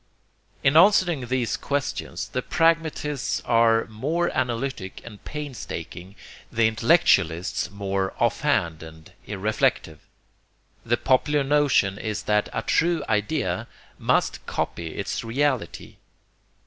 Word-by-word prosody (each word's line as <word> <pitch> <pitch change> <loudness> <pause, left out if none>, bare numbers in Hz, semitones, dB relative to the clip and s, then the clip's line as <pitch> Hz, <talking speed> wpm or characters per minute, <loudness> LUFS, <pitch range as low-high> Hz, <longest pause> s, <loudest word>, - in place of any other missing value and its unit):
In 140 +1 +3
answering 175 -6 +5
these 125 -2 0
questions 145 0 -3
the 125 - -2
pragmatists 160 -3 0
are 115 -1 +3
more 150 +11 -2
analytic 125 -5 -2
and 105 -4 -12
painstaking, 100 - -7 0.4
the 115 0 +2
intellectualists 100 - +2
more 100 -1 -2
offhand 115 - +1
and 80 0 -12 0.2
irreflective. 100 -6 -1 0.8
The 120 +1 +1
popular 145 +4 +2
notion 135 -9 +2
is 110 -2 -3
that 105 0 +1
a - - -3
true 165 -2 +1
idea 105 - -1 0.3
must - - +1
copy 85 - -3
its - - -3
reality. 130 +1 -2
120 Hz, 105 wpm, -24 LUFS, 100-145 Hz, 0.8 s, answering